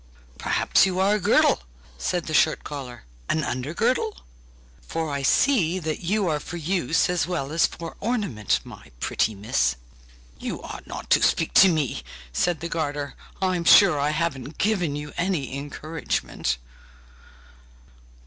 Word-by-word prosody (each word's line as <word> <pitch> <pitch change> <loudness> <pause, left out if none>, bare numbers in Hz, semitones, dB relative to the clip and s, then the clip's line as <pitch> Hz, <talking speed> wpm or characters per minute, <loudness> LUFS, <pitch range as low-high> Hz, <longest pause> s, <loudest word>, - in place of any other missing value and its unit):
'Perhaps - - +3
you 185 -1 -2
are 195 +2 +3
a 210 - +1
girdle?' 170 - +4 0.3
said 165 - -2
the 155 - -4
shirt 150 - +3
collar, 125 -6 -7 0.3
'an 155 - +1
under 130 +3 -3
girdle? 255 - 0 0.6
for 160 -2 -3
I 140 0 -2
see 185 - +3
that 160 -4 -3
you 195 +2 0
are 150 -2 0
for 175 - -7
use 170 0 +1
as 175 -3 0
well 160 -6 -3
as 165 +1 +3
for 165 -1 -8
ornament, 200 - 0
my 70 - -12
pretty 110 - 0
miss!' 65 - +1 0.6
'You - - -5
ought - - -8
not - - -8
to - - +6
speak - - +2
to 190 - +8
me!' 155 -6 -1 0.3
said 170 - 0
the 170 - -3
garter' 145 -4 -3 0.3
'I'm 185 -2 +1
sure 170 -2 +7
I 145 +1 +1
haven't 155 -3 -2
given 185 -8 +1
you 150 0 -6
any 170 -7 -1
encouragement! 145 - -3
160 Hz, 150 wpm, -24 LUFS, 140-180 Hz, 0.6 s, to